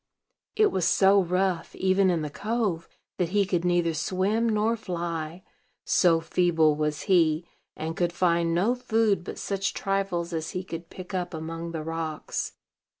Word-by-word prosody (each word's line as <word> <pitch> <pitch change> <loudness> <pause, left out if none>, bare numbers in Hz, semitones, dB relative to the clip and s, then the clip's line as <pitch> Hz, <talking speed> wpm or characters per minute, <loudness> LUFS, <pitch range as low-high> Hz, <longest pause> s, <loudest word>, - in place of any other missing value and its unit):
It 430 -1 +4
was 185 - 0
so 195 +1 +5
rough, 180 0 -1
even 190 0 +3
in 170 -3 +1
the 150 - -4
cove, 205 -4 -2 0.3
that 175 -2 0
he 200 +1 +2
could 180 -3 0
neither 175 -2 +2
swim 195 +8 0
nor 220 +1 +2
fly, 170 -4 -4 0.4
so 170 -3 +4
feeble 165 -2 +2
was 150 -1 -2
he; 170 -4 +3 0.3
and 160 +1 -4
could 175 -1 0
find 170 -1 +1
no 200 +8 +3
food 225 -6 +1
but - - -7
such 195 0 -2
trifles 195 -3 -1
as 160 -1 -2
he 185 - -3
could 170 -2 -7
pick 185 +1 -10
up 180 -2 -2
among 165 +1 -5
the 160 -2 -4
rocks. 160 -1 -4
175 Hz, 160 wpm, -26 LUFS, 165-195 Hz, 0.4 s, so